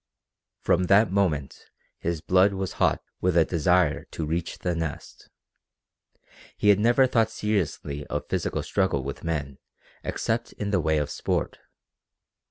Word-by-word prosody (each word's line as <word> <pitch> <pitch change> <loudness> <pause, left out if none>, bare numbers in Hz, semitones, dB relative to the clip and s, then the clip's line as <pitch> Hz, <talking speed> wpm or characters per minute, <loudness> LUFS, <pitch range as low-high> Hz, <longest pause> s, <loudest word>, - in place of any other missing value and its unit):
From 90 - +2
that 100 +2 +4
moment 80 -9 -1 0.3
his 85 -2 -2
blood 95 +3 +4
was 95 -2 -3
hot - - +2 0.2
with 90 -1 +1
a 80 - +5
desire 90 -1 +2
to 80 - -5
reach 80 +2 -3
the 90 - -2
Nest. 80 -3 -6 1.3
He 105 - +2
had 100 -1 +6
never 120 +4 +4
thought 115 -3 +2
seriously 85 -10 -2
of 75 - -4
physical - - -2
struggle 95 -9 0
with 70 +1 -6
men 70 -5 -3 0.4
except 115 +1 -2
in 100 -1 -4
the 95 -4 +2
way 80 0 +1
of 75 -1 -1
sport. - - -2
90 Hz, 145 wpm, -26 LUFS, 75-100 Hz, 1.3 s, had